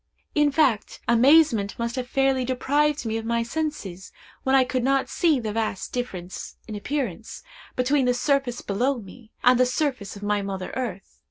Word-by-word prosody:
In 295 -1 +3
fact, 270 -7 +1
amazement 235 -3 +4
must 235 0 -2
have 255 -1 -3
fairly 270 0 +2
deprived 285 +3 +1
me 225 0 -1
of 225 - -4
my 235 +1 0
senses, 235 - -4 0.3
when 265 0 +2
I 265 - +6
could 255 -1 -2
not 270 +1 +1
see 320 -6 +2
the 215 -3 -4
vast 220 -3 -2
difference, 190 -8 -5
in 220 - -6
appearance, 225 - -4 0.3
between 260 +2 +2
the 250 0 +2
surface 270 -2 0
below 250 +7 0
me, 225 +2 -12
and 250 0 +5
the 255 - +6
surface 255 -7 -2
of 200 - -10
my 205 0 +1
mother 195 -2 -5
earth. 225 -7 -5
250 Hz, 175 wpm, -25 LUFS, 215-270 Hz, 0.3 s, I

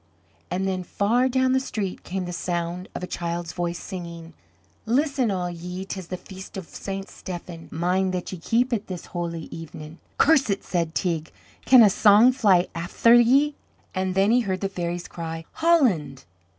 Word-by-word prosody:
And 190 +2 -1
then 185 -1 -1
far 225 +8 +1
down 260 0 +2
the 260 - +3
street 210 -7 -4
came 185 0 -3
the 175 - -5
sound 175 +1 -3
of - - -5
a - - 0
child's 170 -1 -4
voice, 175 -1 -2
singing: 170 -3 -8 0.5
"Listen 270 0 +1
all 185 -3 -1
ye, 180 +2 -6
'tis 190 -3 -6
the 185 - -4
Feast 190 +1 -10
o' - - -3
St. 195 +3 -6
Stephen, 175 -2 -8
Mind 180 +3 0
that 180 -1 -4
ye 185 - -6
keep 240 +8 +1
it, 215 -2 -2
this 180 -3 -6
holy 170 -2 -4
even". 160 0 -9 0.2
"Curse 290 -5 +4
it!" 200 0 -1
said 170 -2 -2
Teig; 165 -3 -1 0.3
"can 255 -3 +8
a 210 - +7
song 215 +5 +6
fly 200 -9 +3
afther 175 +7 +3
ye?" 265 +5 +5 0.4
And 185 -1 -1
then 195 +3 +4
he 245 - +5
heard 190 -6 -2
the 195 - -1
fairies 175 -1 -4
cry 165 -1 -6
"Holland!" 225 - +2
185 Hz, 175 wpm, -24 LUFS, 170-220 Hz, 0.5 s, can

